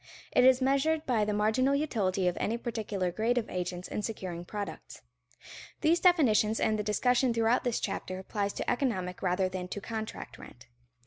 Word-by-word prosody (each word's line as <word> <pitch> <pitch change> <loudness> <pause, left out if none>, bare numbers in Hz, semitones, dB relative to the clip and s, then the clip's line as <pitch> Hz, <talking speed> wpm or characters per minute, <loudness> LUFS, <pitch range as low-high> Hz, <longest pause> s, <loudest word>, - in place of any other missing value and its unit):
It - - +4
is 260 0 +5
measured 300 +4 +1
by 225 -5 +1
the 210 - -1
marginal 220 +7 +2
utility 200 -11 0
of 180 - +1
any 225 +3 -1
particular 215 -6 -3
grade 225 +6 0
of 230 - -2
agents 180 0 -4
in - - -3
securing 185 -6 -5
products. 205 +1 -7 0.8
These 330 +2 +3
definitions 230 - +4
and 215 -1 +1
the - - -1
discussion 245 +4 +2
throughout 230 +2 +2
this 245 -2 0
chapter 185 - -4
applies 200 +1 -3
to - - -5
economic 190 -9 -1
rather 185 0 +1
than 185 -1 -5
to 205 - -5
contract 220 +1 -6
rent. 120 - -13
215 Hz, 175 wpm, -30 LUFS, 190-250 Hz, 0.8 s, is